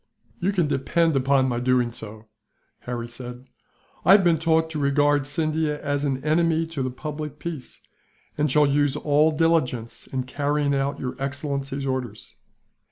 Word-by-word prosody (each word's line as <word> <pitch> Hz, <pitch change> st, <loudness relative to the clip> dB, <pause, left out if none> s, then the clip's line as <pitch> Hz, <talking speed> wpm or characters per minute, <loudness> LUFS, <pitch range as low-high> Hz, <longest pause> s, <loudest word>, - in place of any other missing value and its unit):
"You 185 Hz, +3 st, +1 dB
can 180 Hz, -5 st, +1 dB
depend 160 Hz, +3 st, +1 dB
upon 135 Hz, 0 st, +3 dB
my 120 Hz, -2 st, -1 dB
doing 125 Hz, -1 st, +2 dB
so," 110 Hz, -1 st, -8 dB, 0.5 s
Harry 120 Hz, -1 st, -5 dB
said. 125 Hz, +1 st, -9 dB, 0.6 s
"I 190 Hz, -, +7 dB
have 200 Hz, -1 st, +6 dB
been 170 Hz, -3 st, +3 dB
taught 160 Hz, 0 st, +2 dB
to 155 Hz, -, -3 dB
regard 145 Hz, 0 st, +2 dB
Scindia 155 Hz, 0 st, -1 dB
as 145 Hz, 0 st, -2 dB
an 135 Hz, -2 st, -2 dB
enemy 165 Hz, +1 st, +2 dB
to 145 Hz, -, -2 dB
the 130 Hz, -, -1 dB
public 150 Hz, +2 st, -6 dB
peace, 155 Hz, -5 st, -7 dB, 0.5 s
and 150 Hz, 0 st, +1 dB
shall 150 Hz, +3 st, +4 dB
use 145 Hz, 0 st, +2 dB
all 150 Hz, +1 st, +3 dB
diligence 155 Hz, -8 st, 0 dB
in 130 Hz, -1 st, -3 dB
carrying 145 Hz, +2 st, 0 dB
out 140 Hz, +1 st, -1 dB
your 125 Hz, -, -4 dB
excellency's 140 Hz, 0 st, -3 dB
orders." 125 Hz, -5 st, -4 dB
145 Hz, 160 wpm, -24 LUFS, 130-155 Hz, 0.6 s, I